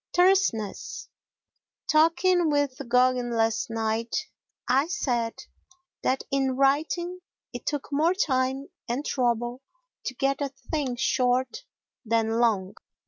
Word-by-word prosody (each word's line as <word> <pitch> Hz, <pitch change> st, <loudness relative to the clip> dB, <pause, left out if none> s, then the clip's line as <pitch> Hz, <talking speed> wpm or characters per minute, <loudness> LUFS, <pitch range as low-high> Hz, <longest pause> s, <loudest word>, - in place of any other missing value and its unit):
Terseness 355 Hz, -, +1 dB, 0.8 s
Talking 330 Hz, +2 st, +4 dB
with 285 Hz, -3 st, 0 dB
Gogin 250 Hz, 0 st, +3 dB
last 225 Hz, 0 st, +1 dB
night, 225 Hz, 0 st, -1 dB, 0.5 s
I 270 Hz, +4 st, +3 dB
said 245 Hz, -10 st, -1 dB, 0.6 s
that 260 Hz, +1 st, 0 dB
in 270 Hz, -2 st, +1 dB
writing 315 Hz, +6 st, +1 dB, 0.3 s
it -, -, -8 dB
took 290 Hz, -2 st, -2 dB
more 320 Hz, +6 st, +2 dB
time 265 Hz, -5 st, 0 dB, 0.2 s
and 260 Hz, +5 st, -2 dB
trouble 240 Hz, 0 st, 0 dB, 0.4 s
to 260 Hz, -, -3 dB
get 275 Hz, +3 st, 0 dB
a 280 Hz, -, 0 dB
thing 270 Hz, -1 st, -3 dB
short 255 Hz, -, 0 dB, 0.4 s
than 225 Hz, 0 st, +1 dB
long. 205 Hz, -5 st, +1 dB
260 Hz, 110 wpm, -26 LUFS, 240-300 Hz, 0.8 s, Talking